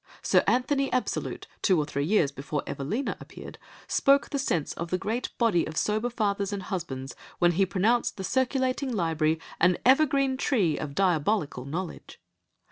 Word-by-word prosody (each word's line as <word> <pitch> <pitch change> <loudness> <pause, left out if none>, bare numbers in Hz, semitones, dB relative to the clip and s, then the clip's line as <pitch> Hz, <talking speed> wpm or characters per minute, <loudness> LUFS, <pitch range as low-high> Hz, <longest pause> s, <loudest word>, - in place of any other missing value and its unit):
Sir - - +4
Anthony 270 +2 +1
Absolute, 255 - -2 0.2
two 185 -4 +3
or 150 - +1
three 140 -1 -2
years 165 -6 +2
before 140 +1 -4
Evelina 210 - -3
appeared, - - -11 0.3
spoke 280 +1 +3
the 280 - -1
sense 175 - -1
of 170 0 -5
the 185 - 0
great 225 +6 -2
body 220 -8 +3
of 155 - -6
sober 215 +3 0
fathers 205 -4 -1
and 200 -2 -4
husbands, 140 -9 -5 0.2
when 175 0 +4
he 190 +3 +2
pronounced 215 +7 +1
the 190 - -5
circulating 260 +3 0
library 165 -5 0 0.2
an 175 +1 +4
evergreen 270 0 +4
tree 210 - +1
of 140 -2 -5
diabolical 175 -6 +1
knowledge. 170 +5 -6
195 Hz, 160 wpm, -27 LUFS, 160-250 Hz, 0.3 s, Sir